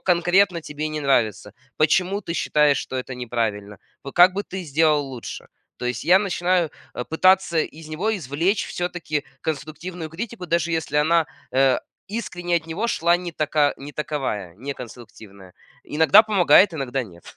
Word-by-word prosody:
конкретно 180 +1 +3
тебе 150 0 -5
не 155 0 -4
нравится? 120 -8 +1 0.2
Почему 180 +6 +2
ты 170 - -5
считаешь, 150 -3 +2
что 130 - -5
это 130 0 -5
неправильно? 110 -5 -3 0.2
Вот, 140 - -8
как 180 +1 +7
бы, 200 - -1
ты 190 -2 -7
сделал 150 -1 +2
лучше?" 125 -3 -8 0.3
То - - -7
есть, 125 -1 -2
я 180 +3 +6
начинаю, 180 -4 0 0.2
э, 125 - -4
пытаться 170 +4 +3
из 155 0 -3
него 200 +8 -1
извлечь 165 - -1
всё-таки 175 -4 -3 0.2
конструктивную 160 +2 -5
критику, 195 +2 -6
даже 170 0 0
если 160 -3 -2
она, 160 +2 +3 0.3
э, 130 -1 +3 0.3
искренне 175 -5 -2
от 160 - -4
него 185 +9 -2
шла 170 -4 +2
не 175 -1 -6
така 150 -2 +1
не 145 +2 -10
таковая, 120 - -3
не 135 +5 -5
конструктивная. 110 -6 -12 0.3
Иногда 160 +7 +6
помогает, 185 -3 +5
иногда 135 -3 -2
нет. 85 -5 -15
155 Hz, 160 wpm, -23 LUFS, 135-175 Hz, 0.3 s, как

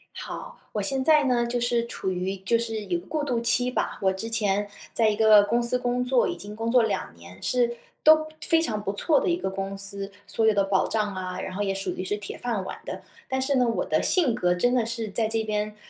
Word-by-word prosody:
好。 - - -8
我 210 - -1
现 265 +5 -1
在 305 -1 +5
呢， 240 -3 +1
就 240 0 -1
是 235 -1 0
处 190 -4 -3
于 185 +2 -3
就 210 +5 +1
是 225 -3 -4
有 175 -2 -1
过 295 - -4
渡 250 -5 0
期 245 +1 +2
吧， - - -2
我 190 0 +3
之 225 +4 -6
前 205 -2 +1 0.3
在 225 -2 +3
一 210 - 0
个 215 -1 +7
公 235 +3 +1
司 250 +1 +3
工 245 0 -1
作， 250 -1 +3
已 - - -3
经 205 +1 -9
工 225 +1 -3
作 250 -1 +5
2 210 - -2
年， 85 +2 -14
是 240 -1 +1 0.3
都 310 0 +6
非 325 -1 +3
常 220 -10 -2
不 205 -1 -3
错 295 +8 +2
的 - - -2
一 345 - +2
个 350 - -3
公 195 +1 -4
司， 195 0 0 0.2
所 225 - +1
有 220 - +5
的 200 -1 +2
保 195 -1 +1
障 210 -3 -1
啊， 185 -1 -4
然 185 -1 -6
后 205 - -1
也 195 -1 0
属 195 0 -3
于 185 - -4
是 205 - -1
铁 205 -1 -7
饭 230 -6 -2
碗 - - -6
的。 - - -6 0.3
但 265 0 -1
是 275 +1 +1
呢， 250 -1 +3
我 230 - 0
的 - - 0
性 305 -11 +2
格， 180 0 +1
真 245 +8 +1
的 235 - +2
是 230 -2 -4
在 220 +2 0
这 225 0 -1
边， 210 0 -2
220 Hz, 270 characters per minute, -25 LUFS, 195-245 Hz, 0.3 s, 个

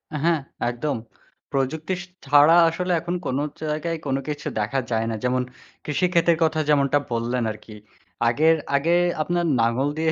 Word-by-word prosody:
আ - - 0
হ্যাঁ, 170 -2 +3 0.3
একদম। 120 +4 -2 0.5
প্রযুক্তি 145 +6 -1
স - - -8 0.2
ছাড়া 145 +3 +6
আসলে 180 +2 -3
এখন 170 +2 -3
কোন 130 - -1 0.2
জায়গায় 155 +2 -2
কোন 135 -2 0
কিছু 150 -1 -4
দেখা 110 +6 0
যায় 110 0 +1
না। - - -2
যেমন 125 0 +1 0.4
কৃষিক্ষেতের 170 +2 +2
কথা 160 0 +1
যেমনটা 140 -1 +3
বললেন 120 +1 -1
আর 105 - -8
কি। 110 - -11 0.5
আগের, 155 +8 +4 0.2
আগে 150 +4 +1 0.3
আপনার 175 +2 0
লাঙল 115 +5 +1
দিয়ে 160 0 +1
150 Hz, 160 wpm, -23 LUFS, 125-165 Hz, 0.5 s, ছাড়া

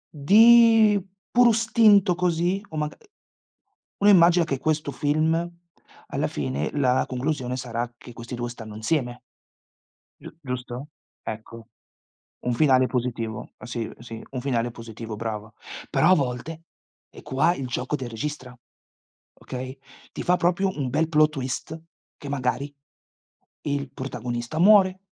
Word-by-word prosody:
di 220 +5 +6 0.3
puro 245 0 +6
istinto, 220 -4 +4
così, 180 +2 0
o 155 - -7
maga 150 0 -2
ehm, 445 - -24 0.9
uno 205 - +4
immagina 175 -2 +6
che 135 -5 -3
questo 155 -1 -1
film, 160 +4 0 0.6
alla - - -1
fine, 70 +2 -3
la 130 -2 +2
conclusione 130 -1 -2
sarà 120 -1 -4
che 120 - -13
questi 120 +2 -8
2 120 0 -3
stanno 110 -3 -9
insieme. 120 +1 -2 1.0
Giu - - -10
giusto? 125 0 -6 0.3
Ecco. 115 +1 -8 0.7
Un 125 - -1
finale 130 -1 +4
positivo. 115 -4 -4
Sì, 120 -2 -4
sì, 115 -1 -9
un 130 - -4
finale 120 -2 -1
positivo, 115 -1 -8
brava. 110 -1 -5 0.4
Però, 165 - +3
a - - +8
volte, 145 +3 -3 0.5
e - - -13
qua 145 +4 +1
il 135 -6 -5
gioco 125 +3 -2
del 130 -4 -6
registra, 125 +1 -6 0.8
okay, 130 +1 -7 0.4
ti - - -5
fa, 180 - +3
proprio, 180 +3 +1
un 135 -4 -2
bel 155 +5 +1
plot 155 -1 +4
twist 140 +3 -5 0.4
che, 145 - -9
magari, 140 +1 -2 0.9
il 140 -2 -3
protagonista 120 +1 -5
muore 190 -1 +6
135 Hz, 135 wpm, -24 LUFS, 120-165 Hz, 1.0 s, a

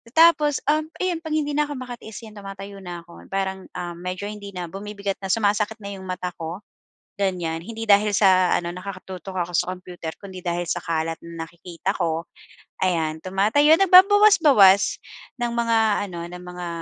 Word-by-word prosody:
Tapos, 315 -3 +5
um, 310 0 0 0.2
ayun 355 -3 0
'pag 310 -1 -2
hindi 295 -1 0
na'ko 295 -1 0
makatiis 245 -3 -8
'yan 215 -1 -12
tumatayo 195 0 -9
na 175 -1 -7
ako. 170 0 -15
Parang, 190 -1 -2
um, 175 -1 -5
medyo 180 +2 -5
hindi 205 -1 -8
na 175 -1 -4
bumibigat 200 0 -4
na, 195 - -4
sumasakit 210 0 +1
na 200 - -5
'yong 190 -1 -9
mata 180 0 -3
ko, 170 +4 -6 0.6
ganyan. 175 -4 -1
Hindi 225 +1 -6
dahil 205 +1 +5
sa 185 -3 +5
ano, 170 0 -4
nakatutok 185 0 -8
ako 175 0 -2
sa 180 - +1
computer, 175 -3 -7
kundi 190 -2 -9
dahil 175 0 -1
sa 175 - -1
kalat 165 -1 -1
na 165 -1 -6
nakikita 175 +3 -4
ko. 165 -1 -1 0.6
Ayan, 160 -3 0
tumatayo 220 +12 +4
nagbabawas-bawas 365 - +6 0.4
ng 240 -1 -1
mga 230 -1 +2 0.3
ano, 170 -1 -7
ng 180 0 -10
mga, 180 0 -7
195 Hz, 170 wpm, -23 LUFS, 175-225 Hz, 0.6 s, nagbabawas-bawas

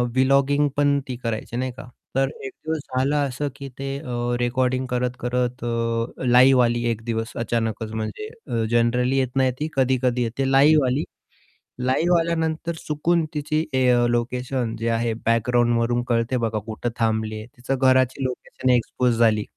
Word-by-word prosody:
Vlogging 140 +2 +3
पण 145 -1 +3
ती 130 - -4
करायची 115 0 -3
नाही 130 +1 -2
का 130 -1 -10 0.3
तर 135 0 +2 0.2
एक 135 - -5
दिवस 160 -1 -1 0.2
झालं 140 +3 +1
असं 135 +3 -3
की 140 -1 -8
ते 135 0 -3
अ, 120 -4 -2
रेकॉर्डिंग 130 +1 0
करत-करत 125 0 -2 0.6
लाईव्ह 125 +1 +6
आली 120 0 0
एक 115 -1 -4
दिवस 115 0 -2
अचानकच 115 -1 -2
म्हणजे 110 - -4 0.2
अ, 115 -4 -1
जनरली 125 +3 +2
येत 130 -1 -1
नाही 130 -1 +3
ती 155 - -2
कधी-कधी 125 -2 +1
येते 135 +4 -1
लाईव्ह 145 +2 +5
आली 135 +5 0 0.8
लाईव्ह 170 +7 +3
आल्यानंतर 165 0 -1
चुकून 160 +2 +1
तिची 155 +1 -1
ए 130 -1 +2 0.2
लोकेशन 120 0 -1
जे 115 - -1
आहे 115 0 0
बॅकग्राऊंडवरून 120 +1 +2
कळते 115 +2 +1
बघा 115 -2 -1
कुठे 115 +2 -3
थांबली 110 -1 0
आहे. 110 - -8
तिचं 125 +2 -2
घराची 130 0 +3
लोकेशन 130 0 -3
एक्सपोज 125 0 +1
झाली. 110 -2 +3
125 Hz, 155 wpm, -23 LUFS, 120-135 Hz, 0.8 s, लाईव्ह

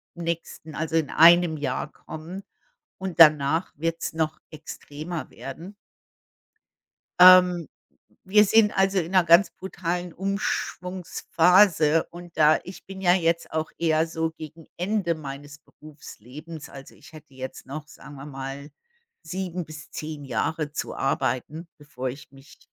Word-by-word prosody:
nächsten, 170 -2 -5
also, 160 +1 -3
in 160 -3 +1
1 170 0 +6
Jahr 140 +1 -3
kommen 170 +5 -9 0.6
und 190 -3 -6
danach 155 +1 +5
wird 165 +2 -2
es - - -3
noch 155 -1 -2
extremer 155 +1 -7
werden. 135 - -9 1.5
Ähm, 180 -2 +7 0.6
wir 210 +2 +5
sind 210 +1 +4
also 195 0 +3
in 170 0 -4
'ner 185 -2 +4
ganz 170 +3 +6
brutalen 180 -2 -4
Umschwungsphase 180 -3 +1
und 175 -1 -12
da 155 0 +5
ich 185 - -11
bin 190 0 -9
ja 175 -2 +4
jetzt 170 -2 0
auch 160 0 -3
eher 160 -1 +1
so 160 0 -2
gegen 160 0 -11
Ende 180 -2 -1
meines 145 -1 -9
Berufslebens, 150 +1 -12
also 135 0 -12
ich - - -17
hätte 155 -3 -14
jetzt 130 0 -8
noch, 150 +3 -7
sagen 145 -1 -13
wir 135 0 -10
mal, 135 +1 -7 0.5
7 180 -2 -4
bis 155 -1 -11
10 155 -2 -6
Jahre 145 +5 -2
zu - - -5
arbeiten, 135 +4 -2
bevor 130 -3 -6
ich 130 +2 -10
mich 135 +1 -17
160 Hz, 135 wpm, -25 LUFS, 150-180 Hz, 1.5 s, Ähm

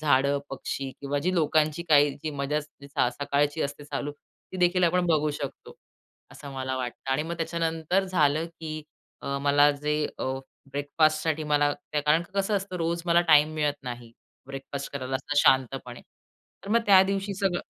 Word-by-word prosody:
झाडं, 140 -1 +3
पक्षी 135 0 -4
किंवा 140 +1 -2
जी 185 +5 0
लोकांची 155 0 +2
काही 145 -1 +6
जी 155 - -2
मजा 145 +1 -1
स 150 - -13 0.5
सकाळची 145 +2 +1
असते 140 +1 -4
चालू, 145 0 -4
ती 150 +5 -15
देखील 180 0 +3
आपण 175 +1 +2
बघू 155 -2 +2
शकतो. 140 -2 -7 0.6
असं 140 -1 -10
मला 130 -1 -3
वाटतं 130 +1 -5
आणि 145 +3 +1
मग 170 +2 -5
त्याच्यानंतर 165 +2 0
झालं 160 -3 +2
की 160 -2 -7 0.6
मला 145 +1 +5
जे 150 +1 -1
अ, - - -3 0.5
ब्रेकफास्टसाठी 155 +2 +1
मला 145 -1 +2 0.2
कारण 150 +3 +3
की 175 - -17
कसं 200 +1 +1
असतं 190 -1 -4
रोज 170 0 -1
मला 170 0 +5
टाईम 155 0 +6
मिळत 150 -2 0
नाही. 120 -2 -7 0.3
ब्रेकफास्ट 135 +1 -6
करायला 130 -1 -2
असं 140 +2 -5
शांतपणे. 130 -1 +1 0.6
तर - - -8
मग 235 - +4
त्या 195 -2 +8
दिवशी 195 +1 -2
सगळं 190 -2 0
150 Hz, 160 wpm, -27 LUFS, 140-170 Hz, 0.6 s, त्या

